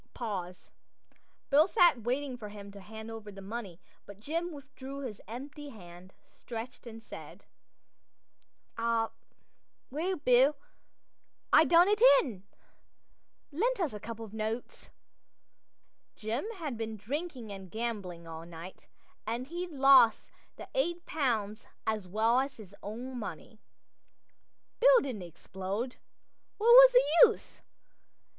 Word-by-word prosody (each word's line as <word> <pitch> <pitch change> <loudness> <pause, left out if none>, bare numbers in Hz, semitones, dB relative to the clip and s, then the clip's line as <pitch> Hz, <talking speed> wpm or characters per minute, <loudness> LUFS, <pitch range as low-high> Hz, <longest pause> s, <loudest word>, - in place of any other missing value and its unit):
Pause. 185 -6 -5 0.8
Bill 300 +4 +6
sat 345 -10 +4
waiting 255 +3 -2
for 215 -4 -8
him 200 -1 -10
to 200 - -11
hand 220 +3 -9
over 220 -2 -8
the 195 - -11
money; 195 -3 -7 0.3
but 200 -1 -11
Jim 335 +9 -3
withdrew 275 -2 -9
his 235 -7 -7
hand 255 +6 -7
empty, 295 -2 -9 0.5
stretched, 240 +1 -9
and 225 -1 -10
said: - - -11 1.3
"Ah, 230 -1 +1 0.8
well, 340 +7 -1
Bill, 270 -1 +4 1.0
I 320 - +8
done 345 +2 +6
it 420 +1 +1 0.2
in. 210 -9 -7 1.1
Lend 465 +11 0
us 330 - -1
a 210 - -6
couple 225 +1 -7
o' - - -12
notes." 220 +2 -5 1.3
Jim 225 - -3
had 300 - -5
been 220 -1 -4
drinking 255 - -5
and 190 -2 -9
gambling 200 -7 -5
all 165 0 -8
night 170 +2 -11 0.4
and 240 +4 -3
he'd 350 +1 -4
lost 270 -5 +5 0.2
the - - -10
eight 345 -8 -1
pounds 225 -8 -1 0.2
as 215 -4 -2
well 220 +6 +2
as 270 +1 -3
his 200 -3 -13
own 245 +5 -6
money. 215 - -8 1.2
Bill - - +7
didn't 245 -8 -5
explode. 190 +7 -5 0.6
What 445 +2 +2
was - - +10
the - - +7
use? 450 - -9
235 Hz, 125 wpm, -31 LUFS, 210-290 Hz, 1.3 s, was